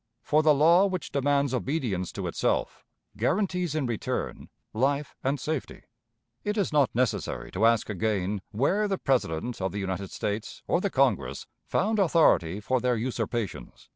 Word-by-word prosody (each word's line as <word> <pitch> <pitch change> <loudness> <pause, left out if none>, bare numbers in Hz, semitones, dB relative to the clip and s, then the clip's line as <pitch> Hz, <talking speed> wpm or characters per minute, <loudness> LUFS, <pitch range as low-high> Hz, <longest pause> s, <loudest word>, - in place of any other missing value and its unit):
For 150 +4 +3
the 155 -1 +5
law 170 +7 +5
which 185 -3 -4
demands 140 -1 +1
obedience 125 - -1
to - - -4
itself - - -1 0.3
guarantees 180 -4 0
in 155 -3 0
return 120 -3 -3 0.2
life 140 +5 0
and 135 +2 0
safety. 155 +1 -4 0.6
It 210 +1 -2
is 195 -6 0
not 145 -3 +4
necessary 125 0 -1
to 105 +5 +3
ask 115 -2 +2
again 105 -1 -1
where 190 - +1
the 195 -1 -1
President 120 - -1
of 95 -1 -1
the 100 - -4
United 95 0 -3
States 105 +1 -4
or - - +2
the - - 0
Congress - - +1 0.2
found 215 +2 +1
authority 155 - +3
for 130 +5 0
their 125 0 +2
usurpations. 115 - -4
130 Hz, 155 wpm, -27 LUFS, 105-155 Hz, 0.6 s, the